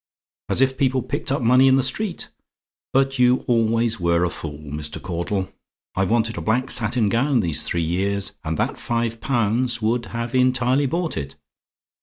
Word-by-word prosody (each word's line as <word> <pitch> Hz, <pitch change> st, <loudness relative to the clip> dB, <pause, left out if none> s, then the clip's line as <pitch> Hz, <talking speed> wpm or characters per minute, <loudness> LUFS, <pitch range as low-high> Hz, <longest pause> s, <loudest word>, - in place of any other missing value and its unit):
As -, -, +2 dB
if 130 Hz, 0 st, +2 dB
people 130 Hz, -1 st, +1 dB
picked 145 Hz, -1 st, -4 dB
up 135 Hz, -2 st, 0 dB
money 125 Hz, +3 st, +5 dB
in 130 Hz, -, +5 dB
the 135 Hz, -, +2 dB
street! 185 Hz, -, -3 dB, 0.6 s
But 135 Hz, 0 st, +1 dB
you 125 Hz, +1 st, +3 dB
always 115 Hz, -1 st, +1 dB
were 85 Hz, 0 st, +2 dB
a 90 Hz, -, 0 dB
fool, 75 Hz, -2 st, -7 dB
Mr. 75 Hz, 0 st, -5 dB
Caudle! 95 Hz, +2 st, -3 dB, 0.4 s
I've 95 Hz, -1 st, 0 dB
wanted 115 Hz, 0 st, 0 dB
a -, -, -5 dB
black 125 Hz, +4 st, 0 dB
satin 115 Hz, -1 st, +1 dB
gown 120 Hz, +4 st, +2 dB
these 80 Hz, -5 st, +2 dB
three 85 Hz, -1 st, 0 dB
years, 95 Hz, +4 st, -1 dB
and 80 Hz, -1 st, -3 dB
that -, -, -2 dB
five 115 Hz, -1 st, -2 dB
pounds 120 Hz, -1 st, 0 dB
would 115 Hz, +2 st, -1 dB
have 115 Hz, 0 st, -5 dB
entirely 130 Hz, +2 st, +2 dB
bought 170 Hz, +4 st, -2 dB
it. 70 Hz, 0 st, -5 dB
115 Hz, 175 wpm, -22 LUFS, 100-130 Hz, 0.6 s, money